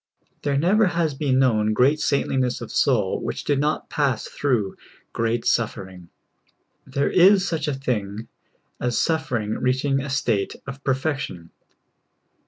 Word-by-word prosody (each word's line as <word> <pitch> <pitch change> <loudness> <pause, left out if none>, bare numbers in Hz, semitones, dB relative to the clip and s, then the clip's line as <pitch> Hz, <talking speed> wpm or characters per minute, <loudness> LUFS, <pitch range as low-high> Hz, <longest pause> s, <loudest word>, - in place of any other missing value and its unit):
There 140 -1 0
never 195 +8 +3
has 170 -4 0
been 135 -2 0
known 110 -5 +2
great 135 +7 +3
saintlincvss 130 -3 0
of 120 - -8
soul 105 -8 +1
which - - -4
did 145 -2 +1
not 150 +2 -1
pass 130 -6 0
through 115 -9 -1 0.4
great 115 +1 -1
suffering. 95 -6 -2 0.8
There 140 +2 0
is 190 +1 +5
such 160 -2 -2
a 150 - 0
thing 110 -5 -3 0.5
as 120 -1 0
suffering 125 -10 -1
reaching 130 +2 +1
a 140 +1 -5
state 115 -7 0
of 140 0 -8
perfection. 135 - -2
130 Hz, 135 wpm, -23 LUFS, 115-145 Hz, 0.8 s, is